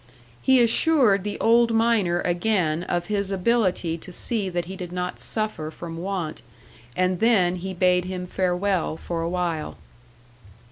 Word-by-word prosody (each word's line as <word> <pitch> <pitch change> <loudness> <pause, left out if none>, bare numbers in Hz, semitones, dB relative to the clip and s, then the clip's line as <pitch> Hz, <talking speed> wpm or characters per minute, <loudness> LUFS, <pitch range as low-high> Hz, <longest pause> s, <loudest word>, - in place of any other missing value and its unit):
He 265 -1 +4
assured 235 - +3
the 205 0 -4
old 230 +1 +4
miner 220 -7 +2
again 175 -3 0
of 175 -1 -2
his 200 0 -1
ability 185 -4 0
to 180 - -9
see 205 +2 -2
that 175 -1 -2
he 190 +3 -7
did 180 -2 -7
not 180 0 -4
suffer 215 -8 -3
from 165 +1 -8
want, 175 -5 -4 0.6
and 185 -1 +1
then 190 -6 +3
he 190 +1 -5
bade 180 0 +2
him 185 -1 -4
farewell 180 -2 -1
for 170 0 -4
a 165 - -2
while. 175 -3 -2
185 Hz, 150 wpm, -24 LUFS, 175-210 Hz, 0.6 s, He